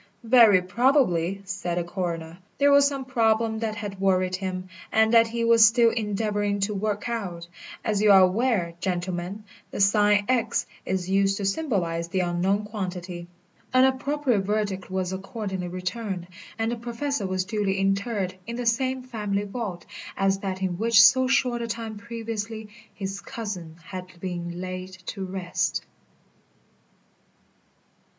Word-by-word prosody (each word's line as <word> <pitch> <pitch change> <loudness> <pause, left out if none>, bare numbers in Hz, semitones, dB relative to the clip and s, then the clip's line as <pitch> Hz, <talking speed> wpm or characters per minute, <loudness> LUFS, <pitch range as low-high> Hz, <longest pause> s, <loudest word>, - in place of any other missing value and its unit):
"Very 225 -6 +6
probably," 195 - +2
said 185 -2 -3
the 175 - +1
coroner, 170 -1 -4 0.2
"there 285 +1 +4
was 280 0 +6
some 275 -2 -3
problem 225 -3 +1
that 220 -1 -2
had 205 -3 -6
worried 185 -1 +2
him, 185 -1 -4 0.2
and 220 +1 +3
that 230 0 +7
he 230 +1 -2
was 230 -1 +6
still 230 +1 +6
endeavouring 205 -2 -1
to 205 +2 0
work 210 +1 -2
out. 185 -8 -4 0.4
As 210 -3 +1
you 210 -1 +6
are 195 -1 +8
aware, 185 -2 +2
gentlemen, 180 +2 -3 0.3
the - - -6
sign 205 0 +4
X 250 -3 +1 0.2
is 185 -1 -1
used 195 +1 +2
to 200 - -3
symbolise 190 - -1
the 185 +2 0
unknown 180 +4 0
quantity." 180 -4 -5 0.5
An 255 - +7
appropriate 265 -2 +1
verdict 200 -1 -2
was 185 -1 -2
accordingly 190 -1 -4
returned, 185 +1 -4 0.3
and 225 +1 0
the 240 - -3
Professor 235 -1 -3
was 185 0 -1
duly 205 -2 -1
interred 195 0 0
in 235 - -4
the 245 0 -3
same 255 +2 +1
family 210 -5 -2
vault 200 -5 -5 0.3
as 195 0 +2
that 190 -1 -4
in 180 -1 -2
which 225 0 +4
so 255 +3 +7
short 250 -2 +1
a 235 - -3
time 225 -1 -4
previously 225 -1 -5 0.2
his 195 0 -5
cousin 190 -10 -6
had 185 -1 -7
been 175 -1 -5
laid 185 0 -5 0.2
to 195 0 -5
rest. 185 -1 -2
205 Hz, 150 wpm, -25 LUFS, 185-230 Hz, 0.5 s, are